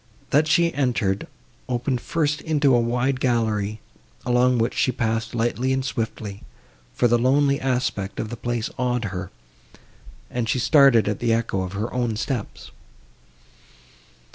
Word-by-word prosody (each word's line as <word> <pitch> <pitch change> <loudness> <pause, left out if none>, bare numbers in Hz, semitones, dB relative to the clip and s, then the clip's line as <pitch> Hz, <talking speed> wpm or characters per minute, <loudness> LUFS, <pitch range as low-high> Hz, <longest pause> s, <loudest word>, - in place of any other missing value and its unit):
That 150 +3 +4
she 170 +1 +3
entered, 120 -8 0 0.4
opened 125 0 -1
first 150 +1 -1
into 150 -4 +2
a 120 - +5
wide 125 +3 0
gallery, 110 -4 0 0.5
along 125 +1 +3
which 115 0 0
she 130 - +1
passed 115 -1 -2
lightly 120 +3 0
and 130 0 0
swiftly; 110 -5 -4 0.5
for 120 - +2
the 120 0 +3
lonely 140 +3 +3
aspect 125 -7 -1
of 110 - -3
the 120 - -5
place 120 0 -3
awed 125 -2 0
her, 90 -2 -5 1.0
and 120 -2 -2
she - - +1
started 135 -4 +5
at 105 -1 -1
the 120 -1 +1
echo 115 -4 0
of 95 0 -5
her 105 +3 -3
own 120 -3 -1
steps. 115 +1 -4
120 Hz, 145 wpm, -23 LUFS, 110-130 Hz, 1.0 s, a